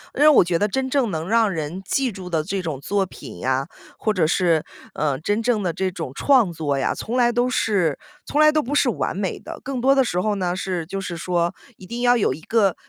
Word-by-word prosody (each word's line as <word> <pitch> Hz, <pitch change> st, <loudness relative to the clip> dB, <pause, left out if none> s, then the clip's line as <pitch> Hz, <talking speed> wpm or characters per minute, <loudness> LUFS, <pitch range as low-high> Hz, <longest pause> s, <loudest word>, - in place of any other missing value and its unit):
因 -, -, -2 dB
为 300 Hz, -, +7 dB
我 300 Hz, -9 st, +7 dB
觉 175 Hz, -1 st, 0 dB
得 205 Hz, -, +2 dB
真 260 Hz, +5 st, -2 dB
正 260 Hz, -4 st, +1 dB
能 160 Hz, +1 st, -4 dB
让 225 Hz, -1 st, +4 dB
人 165 Hz, 0 st, -4 dB
记 260 Hz, +5 st, 0 dB
住 185 Hz, -3 st, -8 dB
的 160 Hz, -3 st, 0 dB
这 190 Hz, +3 st, -3 dB
种 155 Hz, -6 st, -4 dB
作 200 Hz, +6 st, 0 dB
品 130 Hz, -, -11 dB
呀， 130 Hz, -, -1 dB, 0.3 s
或 215 Hz, -, 0 dB
者 175 Hz, -6 st, +2 dB
是， 165 Hz, -2 st, +2 dB, 0.3 s
呃， 145 Hz, -3 st, 0 dB
真 205 Hz, +8 st, 0 dB
正 225 Hz, -3 st, +1 dB
的 180 Hz, -, 0 dB
这 185 Hz, +3 st, -1 dB
种 165 Hz, -7 st, -6 dB
创 245 Hz, -, +3 dB
作 155 Hz, -4 st, -2 dB
呀， 135 Hz, -, 0 dB
从 235 Hz, -, -5 dB
来 240 Hz, -1 st, +4 dB
都 245 Hz, +1 st, +1 dB
是 190 Hz, -, +1 dB, 0.3 s
从 295 Hz, -, +1 dB
来 305 Hz, 0 st, +7 dB
都 305 Hz, 0 st, +2 dB
不 285 Hz, +2 st, -3 dB
是 275 Hz, -, +3 dB
完 225 Hz, -, -2 dB
美 195 Hz, -1 st, -2 dB
的。 -, -, -9 dB
更 260 Hz, 0 st, -3 dB
多 270 Hz, +3 st, +4 dB
的 270 Hz, -, +4 dB
时 180 Hz, -8 st, -1 dB
候 210 Hz, +2 st, 0 dB
呢， 180 Hz, -3 st, -1 dB
是 185 Hz, -3 st, -3 dB
就 195 Hz, +4 st, -5 dB
是 185 Hz, -2 st, -5 dB
说 175 Hz, +1 st, -1 dB, 0.2 s
一 185 Hz, -, -12 dB
定 235 Hz, +5 st, -5 dB
要 245 Hz, 0 st, +4 dB
有 200 Hz, -, +1 dB
一 155 Hz, -, -10 dB
个 200 Hz, 0 st, +2 dB
190 Hz, 270 characters per minute, -22 LUFS, 170-240 Hz, 0.3 s, 为